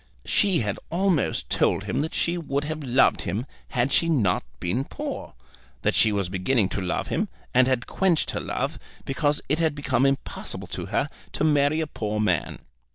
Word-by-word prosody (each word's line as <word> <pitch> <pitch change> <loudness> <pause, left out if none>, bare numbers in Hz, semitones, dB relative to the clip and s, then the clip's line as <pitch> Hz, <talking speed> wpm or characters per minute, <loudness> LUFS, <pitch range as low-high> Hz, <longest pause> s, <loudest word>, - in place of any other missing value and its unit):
She 190 -6 +3
had 105 -2 -2
almost 180 -3 +1
told - - +2
him - - -1
that 160 - -3
she 170 - +1
would 145 -4 -2
have 155 +1 -4
loved 130 0 +3
him 105 +8 -2 0.2
had 125 +1 0
she 165 - +3
not 110 - +2 0.2
been 95 +10 0
poor, - - -6 0.5
that - - +2
she 110 - +5
was 100 -3 0
beginning 95 +3 +1
to 100 - -2
love 90 - -2
him 210 +6 0 0.3
and 130 0 +5
had 130 -2 +1
quenched 185 -4 +1
her - - -2
love, - - -2 0.3
because 145 +2 0
it 150 +4 +1
had 160 -3 +2
become 135 -2 +2
impossible 135 0 -3
to - - -4
her - - 0 0.3
to - - -1
marry 150 0 +3
a - - 0
poor 105 -7 -3
man. 90 -7 +1
135 Hz, 185 wpm, -25 LUFS, 110-155 Hz, 0.5 s, she